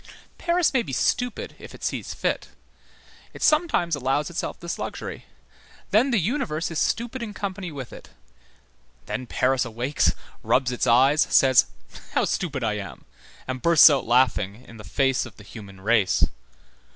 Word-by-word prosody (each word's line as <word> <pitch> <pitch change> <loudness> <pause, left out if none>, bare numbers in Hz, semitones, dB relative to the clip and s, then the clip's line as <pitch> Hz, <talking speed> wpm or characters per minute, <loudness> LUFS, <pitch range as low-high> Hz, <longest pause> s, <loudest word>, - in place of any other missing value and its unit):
Paris 345 -2 +1
may 260 - +3
be 150 - -7
stupid, 245 - -1
if - - -11
it - - -14
sees - - -3
fit; - - -2 0.9
it - - -6
sometimes 305 - +2
allows 145 +4 -1
itself 170 - -4
this 170 0 -5
luxury; - - -6 0.7
then 240 +6 +4
the 240 - +2
universe 190 - -1
is 165 - -2
stupid 240 +2 -1
in 210 -3 -6
company 190 -3 -5
with 135 -5 -8
it; - - -12 1.0
then 130 -1 -5
Paris 130 +2 +1
awakes, 120 +5 0 0.3
rubs 130 -1 +1
its 125 - -1
eyes, 135 +6 +5
says: 130 -1 +5 0.5
"How - - +2
stupid 145 -8 -2
I 105 -2 0
am!" 100 -2 -8 0.4
and 130 -1 -4
bursts 165 -2 +8
out 135 -5 0
laughing 120 -2 +1
in 115 - -13
the 105 - -10
face 135 0 0
of 110 - -16
the 105 - -13
human 100 -2 -12
race. 100 -4 +3
135 Hz, 160 wpm, -24 LUFS, 120-185 Hz, 1.0 s, bursts